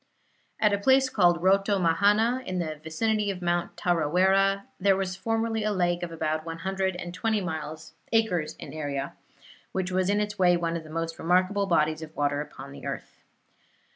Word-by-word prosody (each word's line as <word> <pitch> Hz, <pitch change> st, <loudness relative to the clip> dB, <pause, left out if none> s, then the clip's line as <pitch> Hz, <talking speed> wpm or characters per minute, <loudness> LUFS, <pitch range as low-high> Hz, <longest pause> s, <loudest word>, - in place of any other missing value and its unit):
At 210 Hz, -1 st, +3 dB
a 200 Hz, -, +1 dB
place 265 Hz, +4 st, +4 dB
called 175 Hz, -6 st, +3 dB
Rotomahana, 200 Hz, +5 st, +3 dB
in 185 Hz, -, -2 dB
the 155 Hz, -4 st, -3 dB
vicinity 210 Hz, +6 st, 0 dB
of 190 Hz, -2 st, -3 dB
Mount 175 Hz, 0 st, -1 dB
Tarawera, 190 Hz, +4 st, +2 dB, 0.2 s
there 195 Hz, 0 st, +4 dB
was 190 Hz, -1 st, -2 dB
formerly 225 Hz, +3 st, -1 dB
a 215 Hz, -, +1 dB
lake 175 Hz, -3 st, 0 dB
of 175 Hz, -1 st, -4 dB
about 155 Hz, -1 st, -2 dB
one 165 Hz, 0 st, -6 dB
hundred 190 Hz, +1 st, -1 dB
and 175 Hz, -1 st, -6 dB
twenty 210 Hz, +2 st, 0 dB, 0.7 s
acres 195 Hz, -9 st, +1 dB
in -, -, -10 dB
area, 140 Hz, -3 st, -3 dB, 0.6 s
which 185 Hz, -1 st, -2 dB
was 185 Hz, 0 st, +1 dB
in 205 Hz, +1 st, +2 dB
its 210 Hz, -1 st, -3 dB
way 175 Hz, -1 st, +5 dB
one 170 Hz, -1 st, -1 dB
of 165 Hz, -, -4 dB
the 155 Hz, -, -13 dB
most 165 Hz, +1 st, -4 dB
remarkable 185 Hz, +4 st, +2 dB
bodies 155 Hz, -3 st, +2 dB
of 160 Hz, 0 st, -9 dB
water 145 Hz, 0 st, 0 dB
upon 140 Hz, -2 st, -9 dB
the 140 Hz, -, -8 dB
earth. -, -, -7 dB
180 Hz, 175 wpm, -27 LUFS, 165-200 Hz, 0.7 s, way